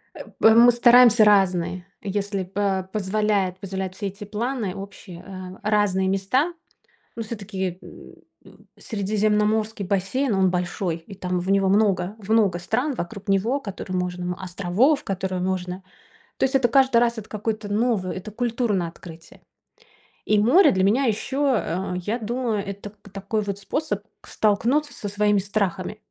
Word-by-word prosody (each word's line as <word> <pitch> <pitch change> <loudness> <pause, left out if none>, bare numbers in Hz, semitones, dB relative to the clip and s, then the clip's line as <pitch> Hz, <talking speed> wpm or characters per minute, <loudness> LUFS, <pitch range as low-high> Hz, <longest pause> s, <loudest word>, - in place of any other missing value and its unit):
Э, - - -8 0.2
п 220 0 +6
Мы 240 +1 +8
стараемся 240 -1 +6
разные, 185 -3 +2 0.2
если 200 -1 -2
по 190 0 -2
позволяет 200 -2 0
позволяют 190 -1 -5
все 200 0 -4
эти 200 +2 -8
планы 220 -1 -3
общие, 195 -3 -10
э, 185 +1 -6
разные 200 -3 +2
места. 200 - +1 0.6
Ну, 230 - -3
всё-таки, 200 -5 -4
м - - -13 0.3
м, - - -19
средиземноморский 210 0 0
бассейн 200 +6 0
он 190 -1 +3
большой, 175 -1 -2
и 165 +4 -12
там 180 -1 -2
в 185 +2 -3
него 195 -1 +3
много 195 -2 +2
в 210 -1 -11
много 210 -6 +3
стран 245 +11 -1
вокруг 200 0 -6
него, 220 +8 +1
которые 195 -4 -5
можно 180 0 -3
островов, 195 - +1
которые 190 -1 -3
можно. 185 0 -3 0.6
То - - -1
есть 265 +1 -1
это 260 -2 +4
каждый 260 0 +4
раз 235 0 +2
это 215 - -12
какое-то 215 -1 -4
новое, 210 -4 0
это 190 +3 -7
культурное 225 -5 -1
открытие. 165 -1 -13 0.8
И 215 - +3
море 290 - +6
для 190 0 +1
меня 230 +8 +3
ещё, 265 +4 0
э, 185 0 -3
я 225 +4 -1
думаю, 235 -1 -2
это 200 +1 -7
к - - -15
такой 200 +2 -3
вот 200 -1 -4
способ 205 +1 -3 0.2
к - - -18
столкнуться 245 +8 +1
со 205 - -6
своими 205 0 +2
страхами. 195 -1 -2
200 Hz, 155 wpm, -23 LUFS, 190-225 Hz, 0.8 s, Мы